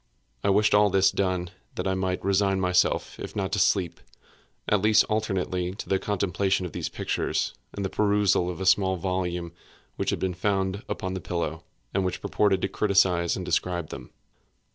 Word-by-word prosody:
I -, -, +2 dB
wished 105 Hz, +2 st, +3 dB
all 105 Hz, 0 st, +5 dB
this 95 Hz, 0 st, +4 dB
done 90 Hz, -2 st, -1 dB, 0.2 s
that -, -, -2 dB
I 95 Hz, -, +1 dB
might 95 Hz, -1 st, -2 dB
resign 100 Hz, 0 st, +2 dB
myself, 90 Hz, -1 st, +1 dB
if -, -, -7 dB
not 95 Hz, -2 st, -2 dB
to 105 Hz, -, 0 dB
sleep, 95 Hz, -1 st, +1 dB, 0.7 s
at 105 Hz, -2 st, +2 dB
least 110 Hz, +1 st, +5 dB
alternately 95 Hz, -4 st, -1 dB
to -, -, -7 dB
the 95 Hz, -, +1 dB
contemplation 95 Hz, -1 st, 0 dB
of 90 Hz, -, -5 dB
these -, -, -4 dB
pictures, -, -, -2 dB, 0.2 s
and 100 Hz, -, -4 dB
the -, -, -1 dB
perusal 100 Hz, -4 st, +2 dB
of 90 Hz, -, -5 dB
a 95 Hz, -, -3 dB
small 95 Hz, 0 st, +4 dB
volume 90 Hz, -1 st, -2 dB, 0.5 s
which -, -, -1 dB
had -, -, 0 dB
been 95 Hz, -1 st, -1 dB
found 95 Hz, +1 st, -1 dB
upon 95 Hz, 0 st, -3 dB
the 95 Hz, -, -4 dB
pillow, 80 Hz, -1 st, -3 dB, 0.3 s
and 95 Hz, -, +1 dB
which 90 Hz, -, -2 dB
purported 100 Hz, -3 st, +1 dB
to -, -, +2 dB
criticise 95 Hz, -4 st, +2 dB
and 90 Hz, -, -5 dB
describe 85 Hz, -3 st, -1 dB
them. -, -, -8 dB
95 Hz, 185 wpm, -26 LUFS, 90-100 Hz, 0.7 s, all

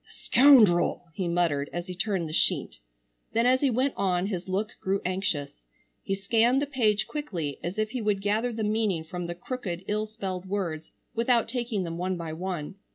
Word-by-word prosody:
"The -, -, -19 dB
scoundrel!" 220 Hz, -11 st, +5 dB
he 180 Hz, +2 st, -2 dB
muttered 170 Hz, -5 st, +1 dB
as 175 Hz, 0 st, -4 dB
he 180 Hz, -, -6 dB
turned 185 Hz, -2 st, -1 dB
the 155 Hz, -, -7 dB
sheet. -, -, +1 dB, 0.5 s
Then 230 Hz, +1 st, +2 dB
as 255 Hz, +1 st, +4 dB
he 280 Hz, -, +3 dB
went 255 Hz, +3 st, +1 dB
on 180 Hz, -2 st, +1 dB
his 190 Hz, -2 st, -4 dB
look 205 Hz, +3 st, -1 dB
grew 195 Hz, +1 st, 0 dB
anxious. 175 Hz, -, -2 dB, 0.4 s
He 195 Hz, -, -2 dB
scanned 230 Hz, +6 st, +3 dB
the 285 Hz, -, 0 dB
page 225 Hz, -7 st, +1 dB
quickly 175 Hz, -, -4 dB
as 175 Hz, +4 st, -4 dB
if 215 Hz, 0 st, 0 dB
he 250 Hz, -1 st, -3 dB
would 210 Hz, -2 st, +1 dB
gather 215 Hz, +5 st, 0 dB
the 225 Hz, -1 st, -3 dB
meaning 210 Hz, -5 st, 0 dB
from 175 Hz, +2 st, -5 dB
the 175 Hz, -, -4 dB
crooked 185 Hz, -3 st, -5 dB
ill 215 Hz, +1 st, -1 dB
spelled 190 Hz, -4 st, -5 dB
words 175 Hz, -6 st, -3 dB, 0.2 s
without 235 Hz, 0 st, +2 dB
taking 230 Hz, -4 st, -2 dB
them 165 Hz, -1 st, -5 dB
one 185 Hz, 0 st, -1 dB
by 165 Hz, -2 st, -5 dB
one. 180 Hz, 0 st, -4 dB
195 Hz, 195 wpm, -27 LUFS, 175-225 Hz, 0.5 s, scoundrel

